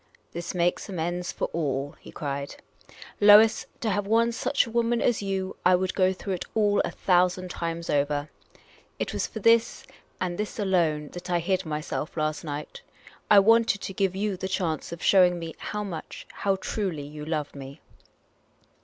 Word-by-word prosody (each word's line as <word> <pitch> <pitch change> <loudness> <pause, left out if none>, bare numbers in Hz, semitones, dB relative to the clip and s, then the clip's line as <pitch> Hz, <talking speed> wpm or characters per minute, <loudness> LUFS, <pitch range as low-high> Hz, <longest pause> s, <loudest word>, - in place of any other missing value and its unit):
" - - -38
This 170 +2 -5
makes 175 +3 0
amends 175 0 -3
for - - -2
all," 145 -3 -2
he - - -13
cried. 140 -1 -4 0.4
" - - -17
Lois, 210 +2 +7
to 220 - 0
have 200 +1 -1
won 230 +2 +3
such 270 +4 +1
a 230 - -9
woman 235 0 +1
as 235 -3 +1
you, 190 -1 -3
I 180 0 +6
would 185 +1 -1
go 185 -1 +3
through 190 +1 -4
it 180 - -4
all 205 -2 +3
a - - -2
thousand 180 0 +1
times 170 -1 -4
over. 145 0 0 0.7
It - - -3
was - - -1
for 220 - -7
this, 230 +2 +3 0.3
and 180 -1 -1
for - - -8
this 210 0 -4
alone, 170 -7 +1
that 180 +1 -9
I 175 - +2
hid 185 +1 -1
myself 155 +1 -4
last 155 -1 -1
night. 150 -1 -6 0.5
I 210 - +7
wanted 225 0 +5
to 195 - -5
give 190 -1 0
you 200 -1 -1
the 190 - -4
chance 175 -5 -2
of 170 - -7
showing 180 -2 +5
me 165 -1 -6
how 210 0 -4
much, 180 -6 -7
how 195 -1 0
truly, 190 -6 -3
you 150 +1 -8
loved 150 -2 -3
me." 140 +2 -9
180 Hz, 190 wpm, -26 LUFS, 160-205 Hz, 0.7 s, Lois